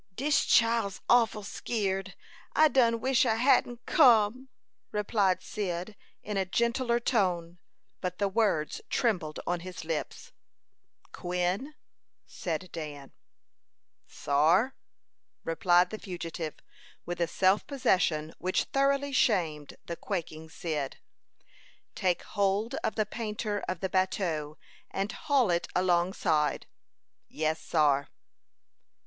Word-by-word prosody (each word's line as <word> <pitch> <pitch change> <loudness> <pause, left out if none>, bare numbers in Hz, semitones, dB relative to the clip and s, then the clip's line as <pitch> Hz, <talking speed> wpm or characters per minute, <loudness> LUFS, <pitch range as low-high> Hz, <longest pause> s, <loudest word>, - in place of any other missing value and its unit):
"Dis 285 +5 +2
chile's 230 -4 +3
awful 225 -3 +3
skeered. 195 -3 -3 0.4
I 310 0 +6
done 235 -4 +3
wish 260 -1 +3
I 220 - +2
hadn't 245 0 +2
come," 255 - +4 0.4
replied 200 -3 +1
Cyd, 185 0 -4 0.3
in 210 -1 -3
a 195 - +2
gentler 235 +4 +1
tone; 180 -8 0 0.4
but 180 -1 -4
the 200 - +1
words 195 -7 0
trembled 180 - 0
on 175 0 -1
his 180 -1 -8
lips. 160 -2 -4 0.8
"Quin," 180 +11 -2 0.5
said 175 +1 -5
Dan. 145 -4 -7 1.0
"Sar," 165 - +2 0.7
replied 175 +2 +3
the 215 - -5
fugitive, 170 -4 -5 0.5
with 175 0 -4
a 170 - +2
self 190 +4 +2
possession 170 - +1
which 185 +1 0
thoroughly 275 +1 +1
shamed 165 - +1
the 170 - -4
quaking 160 -4 -5
Cyd. 155 -5 -4 1.0
"Take 180 -2 0
hold 200 +4 0
of - - -1
the 215 - +1
painter 210 -1 -3
of 185 -2 -3
the 190 - -1
bateau, 170 -5 -1 0.3
and 195 +2 -2
haul 265 -8 +1
it 170 0 0
alongside." 175 -4 +1 0.6
"Yes, 155 +1 -2
sar." 145 -3 +2
190 Hz, 110 wpm, -29 LUFS, 170-230 Hz, 1.0 s, I